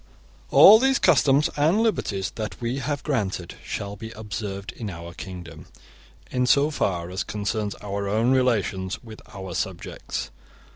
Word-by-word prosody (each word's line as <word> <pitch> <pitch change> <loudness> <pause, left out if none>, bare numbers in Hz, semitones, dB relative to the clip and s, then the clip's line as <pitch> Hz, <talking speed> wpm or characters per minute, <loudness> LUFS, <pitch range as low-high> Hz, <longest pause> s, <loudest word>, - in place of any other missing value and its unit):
* - - -28
All 215 +2 +9
these 265 +2 +3
customs 145 -3 +4
and 155 +8 +3
liberties 100 - -1
that 110 -1 -6
we 120 +3 -2
have 145 +2 -3
granted 100 - -2
shall 100 0 -5
be 110 +2 -8
observed 105 -2 -5
in 110 -3 -6
our 85 -1 -8
kingdom 85 -3 -9 0.6
in 125 0 +1
so 145 +4 +4
far 90 - -1
as 95 - -2
concerns 105 0 -3
our 100 0 -3
own 110 +5 +2
relations 105 -8 0
with 110 -2 -11
our 95 -3 -7
subjects. - - -4
105 Hz, 150 wpm, -24 LUFS, 95-130 Hz, 0.6 s, All